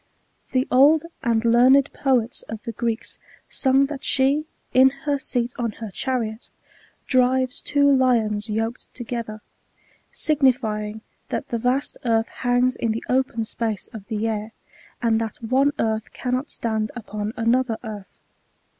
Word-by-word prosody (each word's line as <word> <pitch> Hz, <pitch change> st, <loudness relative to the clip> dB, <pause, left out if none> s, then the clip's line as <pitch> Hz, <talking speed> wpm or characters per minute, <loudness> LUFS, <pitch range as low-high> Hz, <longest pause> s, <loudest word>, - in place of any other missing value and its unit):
The 255 Hz, 0 st, +1 dB
old 290 Hz, +5 st, +6 dB, 0.2 s
and 230 Hz, -1 st, +1 dB
learned 255 Hz, +4 st, +5 dB
poets 250 Hz, -4 st, +1 dB
of 220 Hz, 0 st, -6 dB
the 230 Hz, -, -5 dB
Gieeks 230 Hz, 0 st, -2 dB, 0.3 s
sung 270 Hz, +1 st, +3 dB
that 280 Hz, -1 st, -6 dB
she, 280 Hz, +3 st, +2 dB, 0.3 s
in 260 Hz, +1 st, +7 dB, 0.2 s
her 285 Hz, -1 st, +1 dB
seat 245 Hz, -2 st, -2 dB
on 230 Hz, -3 st, -1 dB
her 220 Hz, -1 st, -7 dB
chariot, 230 Hz, 0 st, -3 dB, 0.6 s
drives 255 Hz, 0 st, +2 dB
two 285 Hz, -1 st, +2 dB
lions 235 Hz, -6 st, +2 dB
yoked 225 Hz, +3 st, -3 dB
together; 230 Hz, -3 st, -5 dB, 0.7 s
sig 305 Hz, -2 st, 0 dB
nifjring 220 Hz, -5 st, +1 dB, 0.3 s
that -, -, -3 dB
the 235 Hz, -, -1 dB
vast 250 Hz, +4 st, 0 dB
earth 225 Hz, -2 st, +1 dB
hangs 250 Hz, 0 st, +1 dB
in 225 Hz, -2 st, -1 dB
the 225 Hz, -, -4 dB
open 250 Hz, -3 st, +1 dB
space 220 Hz, -2 st, -3 dB
of 215 Hz, -4 st, -10 dB
the 220 Hz, -1 st, -1 dB
air, 215 Hz, 0 st, -3 dB, 0.5 s
and 225 Hz, -1 st, +2 dB
that 225 Hz, -2 st, -4 dB
one 260 Hz, +5 st, +2 dB
earth 220 Hz, 0 st, -1 dB
cannot 255 Hz, +3 st, -2 dB
stand 220 Hz, -2 st, -2 dB
upon 215 Hz, -2 st, -4 dB
another 230 Hz, 0 st, +1 dB
earth. 210 Hz, -4 st, -8 dB
235 Hz, 145 wpm, -23 LUFS, 220-260 Hz, 0.7 s, in